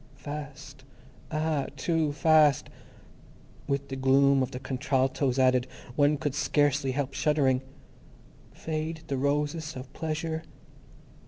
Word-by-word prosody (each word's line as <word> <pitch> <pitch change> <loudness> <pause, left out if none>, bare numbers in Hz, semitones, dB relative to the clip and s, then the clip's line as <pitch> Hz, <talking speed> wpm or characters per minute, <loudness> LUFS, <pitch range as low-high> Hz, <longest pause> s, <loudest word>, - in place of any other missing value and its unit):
Fast! 145 -2 -8 0.5
Ah, 155 -2 -1
too 165 -3 0
Fast. 155 -1 +4 1.0
With 140 0 -2
the 135 - -4
gloom 135 +1 +4
of 130 - 0
the 125 - -6
contraltos 130 0 0
added, 130 -1 +3 0.3
one 145 0 +3
could 145 -1 -2
scarcely 145 -2 +1
help 140 0 -2
shuddering. 135 -2 +2 0.9
_Fade 160 0 -4
the 135 - -2
Roses 150 +3 -1
of 130 +1 -9
Pleasure. 160 0 -3
145 Hz, 110 wpm, -28 LUFS, 135-155 Hz, 1.0 s, Fast